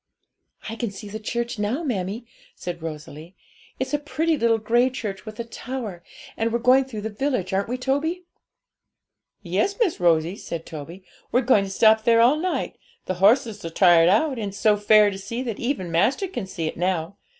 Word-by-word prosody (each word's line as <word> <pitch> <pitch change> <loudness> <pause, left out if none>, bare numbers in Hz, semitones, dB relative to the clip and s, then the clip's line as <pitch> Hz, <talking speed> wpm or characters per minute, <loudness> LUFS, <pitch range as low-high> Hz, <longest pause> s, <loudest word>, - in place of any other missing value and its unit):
'I 225 +1 -5
can 235 -2 -2
see 200 +1 -9
the 215 +2 -6
church 235 +1 -3
now, 225 +10 -1
mammie,' 215 - -3 0.3
said 175 -2 -6
Rosalie; 155 +2 -8 0.4
'it's 260 +3 -3
a 295 - +2
pretty 315 +2 0
little 230 -5 +2
grey 240 +3 +2
church 210 -7 -6
with 215 +1 -9
a - - -1
tower, 230 -5 -6 0.3
and 225 +1 -1
we're 235 - +1
going 255 +3 +4
through 225 -5 -7
the 220 +1 -4
village; 210 -4 -2
aren't 195 +1 0
we, 250 - -2
Toby?' 285 +8 -1 1.2
'Yes, 195 - 0
Miss 435 -9 +1
Rosie,' 170 +1 +2
said 165 -5 -6
Toby; 165 +4 -9 0.3
'we're 250 - +3
going 235 -6 +3
to - - -7
stop 220 +2 +4
there 230 0 +4
all 245 +6 +5
night; 360 +3 -3 0.3
the 185 - -2
horses 220 0 +3
are 165 - -4
tired 170 -1 +5
out, 255 +6 +2
and 205 -2 -3
it's 195 - -10
so 215 -2 +4
fair 210 0 +5
to 195 - -7
see, 230 +6 -4
that 230 -5 -4
even 235 -9 -2
master 220 - +2
can 350 - -5
see 170 -3 -4
it 155 - -4
now. 175 0 -1
215 Hz, 195 wpm, -23 LUFS, 190-250 Hz, 1.2 s, all